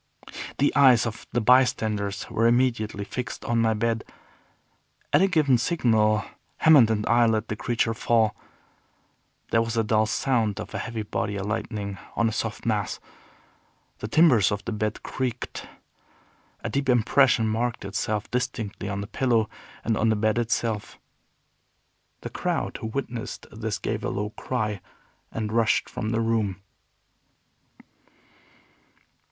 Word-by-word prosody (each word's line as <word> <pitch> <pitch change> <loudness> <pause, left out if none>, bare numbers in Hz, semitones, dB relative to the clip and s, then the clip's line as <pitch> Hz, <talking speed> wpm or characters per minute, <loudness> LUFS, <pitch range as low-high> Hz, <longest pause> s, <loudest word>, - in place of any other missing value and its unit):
The 145 - +2
eyes 130 -5 +6
of 115 -1 -6
the 120 - 0
bystanders 110 -4 +2
were 115 +1 +2
immediately 115 -4 +1
fixed 125 +3 -6
on 115 -1 +1
my 110 -1 +2
bed. 115 +1 0 1.1
At - - +6
a 195 - +5
given 150 -9 +3
signal 110 - +2 0.3
Hammond 145 -8 +6
and 105 -1 0
I 120 0 +4
let 110 -1 0
the 105 - -2
creature 115 +1 0
fall. 110 -1 +2 1.2
There 115 - +4
was 115 0 -2
a 115 - +3
dull 110 0 +2
sound 110 -3 0
of 110 - -7
a - - -3
heavy 115 -1 -4
body 105 0 -2
alighting 100 -1 -3 0.2
on 115 - +2
a - - 0
soft 110 0 -4
mass. 105 -3 -1 1.0
The 105 - -4
timbers 125 - +5
of 100 0 -3
the - - -3
bed 105 0 -2
creaked. 125 -2 -4 1.0
A - - -2
deep 140 -1 -1
impression 125 0 +4
marked 115 0 -1
itself 105 +2 -2
distinctly 110 -5 -3
on 100 0 -3
the - - -4
pillow, 115 -1 +1 0.3
and 115 - +1
on 110 +1 +2
the 110 - +3
bed 110 +2 +1
itself. 115 -2 -2 1.2
The - - -6
crowd - - -2
who - - -5
witnessed 120 -1 -5
this 110 -2 -3
gave - - -3
a - - -1
low 105 +1 -3
cry, 105 -5 -3 0.5
and 110 -1 -3
rushed 115 -1 +2
from 110 - -4
the 115 0 0
room. 110 -4 0
110 Hz, 145 wpm, -25 LUFS, 105-120 Hz, 1.2 s, eyes